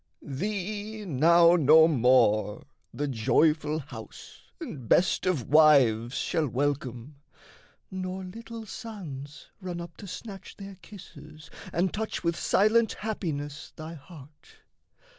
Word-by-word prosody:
"Thee 205 +7 -4
now 170 +2 +5
no 160 0 +6
more 125 -7 +2 0.3
The 145 - -3
joyful 150 +5 +2
house 145 -1 -10 0.2
and 140 - -8
best 185 - +3
of 155 -11 0
wives 135 -6 +5
shall 160 -3 0
welcome, 135 0 -3 0.7
Nor 185 0 -5
little 225 +4 -9
sons 160 - -9
run 180 -2 -5
up 170 -1 -9
to 200 - -10
snatch 195 +1 -9
their 195 -1 -10
kisses 155 -6 -13 0.2
And 175 +2 0
touch 220 -2 -4
with 170 -1 0
silent 220 +6 +2
happiness 155 -9 -5
thy 160 +1 -8
heart. 150 - -15
160 Hz, 115 wpm, -27 LUFS, 145-190 Hz, 0.7 s, no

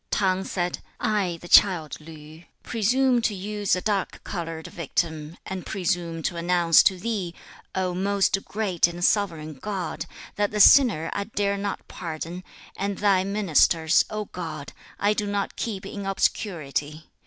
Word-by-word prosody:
3. - - 0
T'ang 190 -1 +1
said, 175 -1 -2 0.2
'I 200 -5 0
the - - -8
child 175 -6 +5
Li, 155 +1 -13 0.2
presume 245 +3 +2
to 220 -2 0
use 205 +1 -1
a 185 - -3
dark 200 -2 -2
coloured 165 -3 -5
victim, 160 0 -3
and 190 -2 -5
presume 175 -3 -2
to 170 - -2
announce 170 -1 +5
to 190 - +3
Thee, 190 -4 -3 0.4
O 185 -1 0
most 195 +1 +1
great 200 -6 +1
and 175 +1 -2
sovereign 165 -7 0
God, 190 +6 -4 0.3
that 205 0 +2
the 210 - -3
sinner 210 - +6
I 200 - -2
dare 200 -2 -1
not 200 0 -4
pardon, 170 +1 -6 0.3
and 200 0 -2
thy 195 -2 +3
ministers, 175 -4 +3
O 215 0 -3
God, 160 -6 -7 0.3
I 205 +1 +3
do 210 -1 -2
not 200 -1 -2
keep 200 -5 -4
in 200 0 -6
obscurity. 155 -6 -2
185 Hz, 155 wpm, -25 LUFS, 165-205 Hz, 0.4 s, sinner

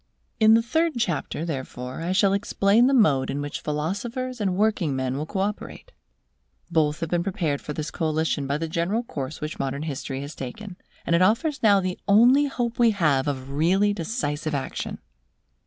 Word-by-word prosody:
In 220 0 +7
the 230 - +3
third 325 +6 +1
chapter, 170 -6 -2
therefore, 130 -3 -5
I 170 +2 -2
shall 195 +1 +3
explain 200 +3 +3
the 275 - +2
mode 145 - +3
in 140 +1 -2
which 145 0 -4
philosophers 220 - -3
and 190 -3 0
working 205 -9 +1
men 130 0 -1
will 150 +3 -3
co 190 +1 -2
operate. 210 - -5 0.8
Both 155 -2 +1
have 165 - -2
been 175 -1 +2
prepared 175 -7 -2
for 150 - -6
this 155 +1 -4
coalition 155 -3 -1
by 140 +1 0
the 165 +2 -3
general 170 +8 -1
course 145 - -6
which 155 +1 -5
modern 140 +2 -2
history 135 -3 -4
has 145 +2 -7
taken, 180 +9 -8 0.3
and 170 - +2
it 170 - +3
offers 240 - +2
now 205 -3 +5
the 185 -1 -3
only 245 +8 +6
hope 240 -4 -3
we 235 -1 +6
have 150 -10 +1
of 135 -1 -3
really 185 +8 +2
decisive 155 - -3
action. 135 -1 -4
170 Hz, 185 wpm, -24 LUFS, 145-215 Hz, 0.8 s, In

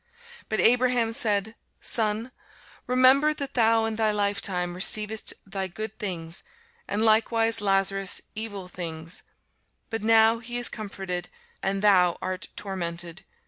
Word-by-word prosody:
But 220 - -1
Abraham 245 -1 +3
said, 215 -1 0 0.3
Son, 220 +2 -1 0.6
remember 260 +4 +4
that 280 -2 -5
thou 225 -1 +3
in 220 -1 -3
thy 220 -1 +2
lifetime 200 -4 -1
receivedst 210 +4 +3
thy 195 -1 -4
good 215 +4 -7
things, 170 -6 -3 0.5
and 215 +2 0
likewise 225 0 +2
Lazarus 195 -1 +2
evil 205 -4 -5
things: 165 -2 -6 0.7
but 225 - -3
now 225 +1 +4
he 240 +1 -5
is 245 - +4
comforted, 190 -4 -5 0.3
and 195 +1 -2
thou 180 -4 +4
art 185 0 -4
tormented. 175 -2 -4
210 Hz, 125 wpm, -26 LUFS, 190-225 Hz, 0.7 s, remember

